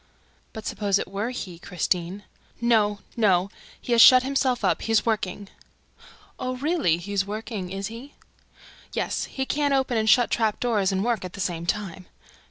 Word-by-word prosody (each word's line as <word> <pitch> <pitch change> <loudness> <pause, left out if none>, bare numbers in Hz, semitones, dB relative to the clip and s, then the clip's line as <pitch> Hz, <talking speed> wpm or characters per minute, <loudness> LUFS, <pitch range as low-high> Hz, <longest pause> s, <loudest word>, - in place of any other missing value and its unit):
"But 220 -1 -9
suppose 200 -2 0
it - - -3
were 200 +5 -3
HE, 185 -9 -7
Christine?" 180 +2 -2 0.4
"No, 215 -4 +2
no! 195 -4 +2 0.3
He - - -7
has 235 -1 +6
shut 255 +1 +9
himself 260 -4 0
up, 175 -3 +1
he 225 - -3
is 225 - +3
working." 205 -3 -2 0.9
"Oh, 255 0 -3
really! 285 - +1
He's 195 +3 -2
working, 210 -2 -5
is 195 +1 -4
he?" 235 +7 -9 0.8
"Yes, - - -2
he 265 - -4
can't 285 0 +1
open 260 -4 +1
and 220 0 +1
shut 240 +3 +5
the - - +1
trap 220 -2 0
doors 210 -6 +1
and 190 +2 -1
work 235 -5 0
at 185 - -7
the - - -9
same 170 -2 -3
time." 190 -2 -3
210 Hz, 180 wpm, -25 LUFS, 190-240 Hz, 0.9 s, shut